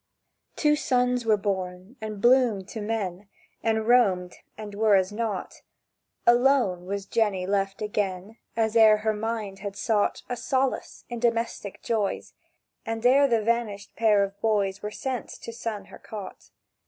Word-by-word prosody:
Two 300 Hz, -1 st, +3 dB
sons 250 Hz, -4 st, +1 dB
were 215 Hz, -1 st, +5 dB
born, 190 Hz, +1 st, -4 dB
and 215 Hz, -2 st, -5 dB
bloomed 235 Hz, -5 st, +3 dB
to 220 Hz, -, -6 dB
men, 205 Hz, -3 st, -3 dB, 0.3 s
And 220 Hz, -1 st, 0 dB
roamed, 195 Hz, -8 st, +3 dB, 0.2 s
and 210 Hz, -1 st, -7 dB
were 210 Hz, 0 st, +4 dB
as 190 Hz, 0 st, +2 dB
not: 210 Hz, -3 st, -4 dB, 0.6 s
Alone 240 Hz, -7 st, +3 dB
was 200 Hz, 0 st, -3 dB
Jenny 205 Hz, -4 st, 0 dB
left 195 Hz, +1 st, -1 dB
again 205 Hz, 0 st, -3 dB, 0.2 s
As 220 Hz, -1 st, +1 dB
ere 220 Hz, -2 st, +7 dB
her 220 Hz, -, +3 dB
mind 215 Hz, -2 st, -4 dB
had 200 Hz, 0 st, -6 dB
sought 215 Hz, -2 st, 0 dB
A 245 Hz, -, -2 dB
solace 260 Hz, +2 st, -2 dB
in 240 Hz, -1 st, -5 dB
domestic 230 Hz, -4 st, -1 dB
joys, 215 Hz, -4 st, -1 dB, 0.5 s
And 225 Hz, 0 st, -4 dB
ere 275 Hz, +3 st, +6 dB
the 230 Hz, -4 st, +1 dB
vanished 220 Hz, -3 st, -1 dB
pair 215 Hz, -3 st, +4 dB
of 200 Hz, +1 st, -6 dB
boys 200 Hz, -3 st, +1 dB
Were 210 Hz, -, -3 dB
sent 255 Hz, +2 st, -4 dB
to 230 Hz, -, -6 dB
sun 230 Hz, -3 st, -5 dB
her -, -, -13 dB
cot. 205 Hz, -3 st, -9 dB
215 Hz, 155 wpm, -26 LUFS, 200-235 Hz, 0.6 s, ere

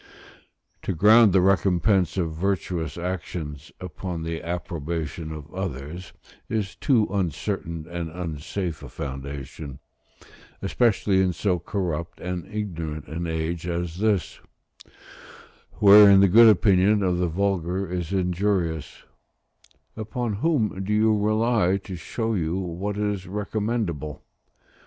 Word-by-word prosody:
To -, -, -2 dB
ground 110 Hz, +5 st, +7 dB
the 95 Hz, 0 st, +4 dB
recompense 95 Hz, 0 st, +2 dB
of 85 Hz, -3 st, -1 dB
virtuous 90 Hz, -2 st, -2 dB
actions 80 Hz, -4 st, -5 dB
upon 90 Hz, -1 st, -5 dB
the 80 Hz, 0 st, -4 dB
approbation 80 Hz, -2 st, -4 dB
of 80 Hz, 0 st, -9 dB
others 85 Hz, -1 st, -5 dB, 0.4 s
is 105 Hz, -4 st, -2 dB
too 120 Hz, -7 st, +2 dB
uncertain 90 Hz, -3 st, -2 dB
and 85 Hz, -1 st, -4 dB
unsafe 85 Hz, 0 st, -4 dB
a -, -, -9 dB
foundation, 70 Hz, +1 st, -7 dB, 0.8 s
especially 100 Hz, -2 st, +2 dB
in 95 Hz, -1 st, +1 dB
so 90 Hz, 0 st, 0 dB
corrupt 85 Hz, -3 st, -3 dB
and 90 Hz, 0 st, -4 dB
ignorant 85 Hz, -8 st, -4 dB
an 85 Hz, +2 st, -4 dB
age 80 Hz, +1 st, -3 dB
as 85 Hz, -1 st, -3 dB
this, 105 Hz, -4 st, 0 dB, 1.3 s
wherein 100 Hz, -1 st, +8 dB
the 100 Hz, -, +6 dB
good 115 Hz, +5 st, +8 dB
opinion 100 Hz, 0 st, +4 dB
of 90 Hz, -2 st, +1 dB
the 90 Hz, -, +1 dB
vulgar 95 Hz, +1 st, -1 dB
is 90 Hz, -1 st, -4 dB
injurious: 90 Hz, -4 st, -1 dB, 0.9 s
upon 110 Hz, +1 st, -3 dB
whom 110 Hz, -, +1 dB
do 105 Hz, +2 st, -1 dB
you 110 Hz, +1 st, +4 dB
rely 110 Hz, -2 st, +2 dB
to 95 Hz, -, -7 dB
show 115 Hz, +7 st, -3 dB
you 85 Hz, -3 st, -1 dB
what 95 Hz, +3 st, -3 dB
is 105 Hz, -3 st, -2 dB
recommendable? 100 Hz, -, -3 dB
90 Hz, 120 wpm, -25 LUFS, 80-100 Hz, 1.3 s, wherein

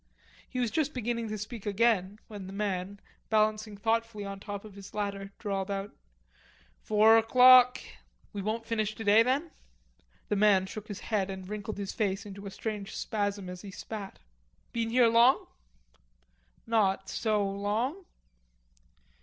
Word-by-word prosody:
He 255 Hz, -, -6 dB
was 240 Hz, -3 st, 0 dB
just 305 Hz, -2 st, -1 dB
beginning 235 Hz, -1 st, -2 dB
to 215 Hz, -, -3 dB
speak 215 Hz, +1 st, -7 dB
again 205 Hz, -2 st, +2 dB
when 205 Hz, -3 st, -8 dB
the 190 Hz, -, -8 dB
man, 200 Hz, -1 st, -3 dB, 0.3 s
balancing 215 Hz, -1 st, +1 dB
thoughtfully 225 Hz, 0 st, -1 dB
on 195 Hz, 0 st, -6 dB
top 205 Hz, +1 st, -7 dB
of 210 Hz, -, -11 dB
his 200 Hz, +1 st, -12 dB
ladder, 200 Hz, -1 st, -3 dB
drawled 195 Hz, -2 st, -3 dB
out: 200 Hz, 0 st, -3 dB, 0.9 s
"Four 215 Hz, +1 st, +5 dB
o'clock." 250 Hz, +2 st, +7 dB, 0.5 s
"We 200 Hz, -, -4 dB
won't 220 Hz, +3 st, -3 dB
finish 215 Hz, -2 st, -1 dB
today 220 Hz, 0 st, +5 dB
then?" 275 Hz, +7 st, 0 dB, 0.8 s
The 210 Hz, -, 0 dB
man 200 Hz, -2 st, +4 dB
shook 215 Hz, +2 st, -8 dB
his 205 Hz, -2 st, -7 dB
head 200 Hz, -4 st, -1 dB
and 190 Hz, -1 st, -7 dB
wrinkled 210 Hz, +1 st, -5 dB
his 200 Hz, -1 st, -4 dB
face 200 Hz, -2 st, -1 dB
into 200 Hz, 0 st, -8 dB
a -, -, -4 dB
strange 210 Hz, 0 st, -5 dB
spasm 205 Hz, -2 st, -2 dB
as 180 Hz, 0 st, -7 dB
he 205 Hz, -, -9 dB
spat. 200 Hz, +1 st, -7 dB, 0.6 s
"Been 230 Hz, -1 st, -1 dB
here 245 Hz, +1 st, +5 dB
long?" 235 Hz, +3 st, +5 dB, 1.2 s
"Not 195 Hz, -4 st, +1 dB
so 215 Hz, -3 st, 0 dB
long." 215 Hz, -, -2 dB
210 Hz, 150 wpm, -29 LUFS, 200-225 Hz, 1.2 s, o'clock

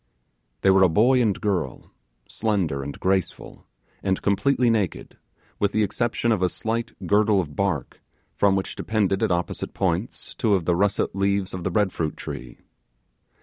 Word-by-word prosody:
They 95 Hz, -, +5 dB
were 95 Hz, 0 st, +5 dB
a 95 Hz, -, +6 dB
boy 125 Hz, +9 st, +4 dB
and 105 Hz, -5 st, +1 dB
a -, -, -13 dB
girl, 90 Hz, -, -2 dB, 0.4 s
slender 95 Hz, -11 st, -1 dB
and 70 Hz, +1 st, -7 dB
graceful, 95 Hz, -1 st, -2 dB, 0.3 s
and 95 Hz, -1 st, 0 dB
completely 120 Hz, +4 st, +2 dB
naked, 105 Hz, -5 st, -2 dB, 0.4 s
with 100 Hz, 0 st, +1 dB
the 110 Hz, -, +2 dB
exception 120 Hz, +3 st, 0 dB
of 105 Hz, -5 st, +1 dB
a 90 Hz, -, +3 dB
slight 115 Hz, +3 st, -3 dB
girdle 105 Hz, 0 st, +3 dB
of 75 Hz, -6 st, -4 dB
bark, 95 Hz, -7 st, -2 dB, 0.3 s
from 100 Hz, -1 st, +3 dB
which 95 Hz, -, -3 dB
depended 100 Hz, -3 st, 0 dB
at 110 Hz, -4 st, +1 dB
opposite 85 Hz, -1 st, -2 dB
points 95 Hz, +4 st, -2 dB
two 110 Hz, -4 st, +2 dB
of 90 Hz, -4 st, -1 dB
the 90 Hz, -, +2 dB
russet 100 Hz, +1 st, 0 dB
leaves 100 Hz, -1 st, 0 dB
of 90 Hz, -2 st, -5 dB
the -, -, 0 dB
bread 105 Hz, -3 st, +1 dB
fruit 80 Hz, -2 st, -3 dB
tree. -, -, -7 dB
100 Hz, 170 wpm, -24 LUFS, 90-110 Hz, 0.4 s, a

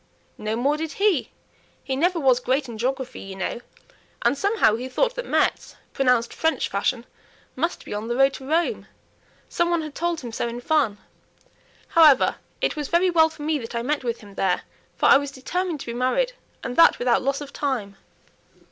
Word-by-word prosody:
"No 215 Hz, +1 st, -2 dB
more 275 Hz, +6 st, +1 dB
did 315 Hz, -1 st, -4 dB
he. 395 Hz, -7 st, +1 dB, 0.5 s
He 265 Hz, -, -2 dB
never 345 Hz, +5 st, +1 dB
was 260 Hz, -4 st, +4 dB
great 260 Hz, +2 st, 0 dB
in 230 Hz, -2 st, -8 dB
geography, 260 Hz, +1 st, -2 dB
you 195 Hz, 0 st, -8 dB
know; 195 Hz, +5 st, -4 dB, 0.6 s
and -, -, +3 dB
somehow 395 Hz, -, +2 dB
he 250 Hz, +3 st, -5 dB
thought -, -, +1 dB
that -, -, -6 dB
Metz, -, -, 0 dB, 0.2 s
pronounced 250 Hz, -3 st, +2 dB
French 320 Hz, 0 st, 0 dB
fashion, 235 Hz, +5 st, -1 dB, 0.5 s
must 335 Hz, +6 st, -2 dB
be -, -, -6 dB
on 210 Hz, +2 st, -4 dB
the 240 Hz, -, -1 dB
road 270 Hz, +1 st, +4 dB
to 265 Hz, 0 st, -9 dB
Rome. 335 Hz, +2 st, 0 dB, 0.6 s
Some 345 Hz, 0 st, 0 dB
one 340 Hz, -2 st, +1 dB
had 305 Hz, -2 st, -7 dB
told 340 Hz, 0 st, -2 dB
him 240 Hz, -3 st, -7 dB
so 230 Hz, -, -2 dB
in 235 Hz, +1 st, -5 dB
fun. 255 Hz, -6 st, +1 dB, 0.9 s
However, 310 Hz, -5 st, +5 dB, 0.2 s
it -, -, 0 dB
was 295 Hz, -2 st, -3 dB
very 355 Hz, +2 st, +2 dB
well 320 Hz, -2 st, +5 dB
for 315 Hz, -2 st, -10 dB
me 305 Hz, 0 st, 0 dB
that 230 Hz, -1 st, -7 dB
I 235 Hz, -, -1 dB
met 290 Hz, +2 st, -1 dB
with 235 Hz, -1 st, -3 dB
him 205 Hz, -2 st, -13 dB
there, 190 Hz, -2 st, 0 dB, 0.3 s
for -, -, 0 dB
I -, -, +8 dB
was 285 Hz, 0 st, -3 dB
determined 320 Hz, +4 st, -3 dB
to -, -, -7 dB
be -, -, -5 dB
married, 255 Hz, -, 0 dB, 0.3 s
and 245 Hz, -, -4 dB
that 335 Hz, -, +7 dB
without 245 Hz, -1 st, +2 dB
loss 275 Hz, +1 st, -1 dB
of 290 Hz, -1 st, -9 dB
time." 240 Hz, -9 st, -2 dB
270 Hz, 200 wpm, -24 LUFS, 240-320 Hz, 0.9 s, I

